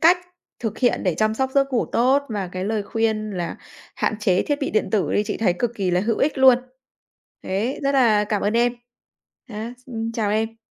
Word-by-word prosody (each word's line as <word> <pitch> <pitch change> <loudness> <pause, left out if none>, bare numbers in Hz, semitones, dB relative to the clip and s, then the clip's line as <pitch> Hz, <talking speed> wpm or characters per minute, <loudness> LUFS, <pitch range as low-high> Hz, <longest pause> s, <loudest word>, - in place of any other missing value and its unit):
cách 345 +2 +6 0.4
thực 220 -3 -4
hiện 245 -2 +2
để 180 -3 +1
chăm 215 0 +1
sóc 265 +2 -1
giấc 275 -1 +2
ngủ 240 - +1
tốt, 265 +4 +3
và 200 -4 -3
cái 185 0 -3
lời 215 0 -1
khuyên 220 -1 -1
là 175 -3 -4 0.4
hạn - - 0
chế 185 -3 +2
thiết 290 -1 -1
bị 275 - -1
điện 215 - +1
tử 195 -7 +1
đi, 205 - +3
chị - - -3
thấy 200 -6 +2
cực 240 -1 -1
kỳ 190 -4 -1
là 180 - +2
hữu 220 +3 0
ích 290 -1 +1
luôn. 260 -2 +7 0.8
Thế, 215 +10 -2
rất 275 0 +1
là 225 -6 +4
cảm 210 -1 -1
ơn 205 - +1
em. 240 +1 +3 0.8
Nhá, 225 +2 -6
s - - -14 0.2
chào 210 -3 0
em. 225 +1 -1
220 Hz, 220 wpm, -22 LUFS, 205-250 Hz, 0.8 s, luôn